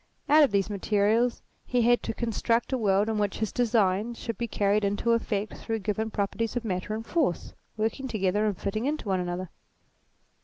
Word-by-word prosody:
Out 305 +2 +6
of 285 - +4
these 200 -2 +1
materials 210 +3 +1 0.2
he 245 -1 +1
had 240 +1 +4
to - - -3
construct 235 +2 0
a - - +2
world 200 -1 +2
in 220 -1 -1
which 205 -2 0
his 220 -2 -2
designs 225 -1 +1
should 230 - -4
be 235 - -3
carried 205 -1 +1
into 205 +4 +1
effect 215 -3 0
through 225 -1 -3
given 215 +1 -2
properties 215 +2 -2
of 245 -1 -2
Matter 190 +1 -2
and 225 +1 -5
Force, 295 - -1 0.2
working 225 +5 -1
together 210 -2 +1
and 200 -4 -1
fitting 215 +4 -2
into 295 -8 -2
one 190 -1 +1
another. 180 0 -4
215 Hz, 190 wpm, -27 LUFS, 200-235 Hz, 0.2 s, Out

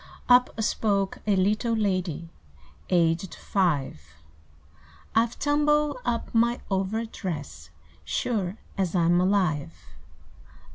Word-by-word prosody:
Up 250 -2 +4
spoke 200 -3 0
a 205 - +4
little 210 +5 +1
lady 185 -6 -1 0.6
Aged 170 0 +1
five; 150 - 0 1.1
"I 225 +1 +4
've 235 - -14
tumbled 295 0 +2
up 235 -1 -2
my 235 +1 +2
over 195 +4 0
dress, 145 - -6 0.3
Sure 205 -5 -2 0.2
as 185 -2 0
I 175 - +3
'm 175 +1 +4
alive! 180 -5 +1
195 Hz, 105 wpm, -26 LUFS, 175-230 Hz, 1.1 s, Up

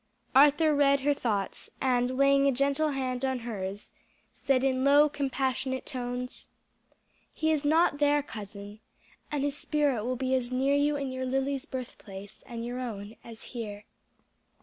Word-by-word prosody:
Arthur 295 +3 +6
read 280 -1 +4
her 290 +2 +3
thoughts, 210 -8 -2
and 255 -1 +1
laying 275 0 +5
a - - +4
gentle 280 +4 +1
hand 260 -2 -2
on 260 -2 0
hers, 200 -3 -5 0.4
said 265 -2 +1
in 260 -1 +1
low 285 +2 +6
compassionate 265 -2 -2
tones: 250 0 -5 0.8
"He 315 0 0
is 305 -2 +1
not 305 0 +3
there, 290 0 +3
cousin, 205 -3 -9 0.5
and 290 -2 -1
his 285 0 0
spirit 290 -7 0
will 250 +2 -1
be 260 +1 -1
as 255 -1 0
near 265 +2 +2
you 290 +1 +2
in 275 -2 -3
your 260 0 -3
Lily's 270 +2 -1
birthplace, 205 -8 -8
and 235 -1 -5
your 245 +1 -4
own, 215 -3 -6
as 230 -2 -8
here. 210 -4 -6
260 Hz, 155 wpm, -29 LUFS, 245-280 Hz, 0.8 s, Arthur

